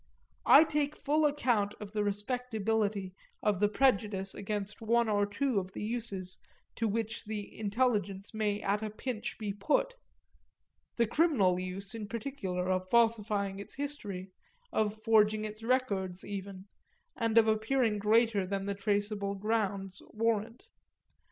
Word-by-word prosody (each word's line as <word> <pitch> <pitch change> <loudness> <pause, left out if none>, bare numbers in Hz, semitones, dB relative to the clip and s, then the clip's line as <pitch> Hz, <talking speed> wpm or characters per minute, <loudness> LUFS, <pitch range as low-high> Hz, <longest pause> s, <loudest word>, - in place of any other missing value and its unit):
I 290 - +9
take 300 -1 -1
full 300 +1 +2
account 235 -8 +1
of 210 -1 -8
the 210 -1 0
respectability 210 -2 -1 0.3
of 205 -3 +2
the 205 - +4
prejudice 205 -6 +2
against 205 0 -4
one 235 +1 +2
or 205 -1 +2
two 255 +1 0
of 190 0 -7
the - - -5
uses 210 -5 -3 0.4
to 225 - +1
which 220 +2 -2
the 210 -1 -5
intelligence 205 -3 0
may 210 -1 0
at 205 +2 +1
a 215 - -3
pinch 215 +1 -4
be 210 -3 -3
put 300 - +1 1.0
the 235 - +3
criminal 230 - +3
use 185 +3 -5
in 220 -2 -5
particular 210 -6 -3
of 185 0 -1
falsifying 210 -4 +2
its 200 - -9
history, 205 -10 -5 0.4
of 215 0 0
forging 215 -1 +4
its 215 +1 -7
records 205 -7 0
even, 195 -1 -6 0.5
and 230 -1 0
of 225 -1 +7
appearing 220 0 +2
greater 215 -2 +3
than 195 0 -2
the 200 - -1
traceable 200 0 -1
grounds 200 -2 -1
warrant. 225 - -1
210 Hz, 140 wpm, -31 LUFS, 200-230 Hz, 1.0 s, I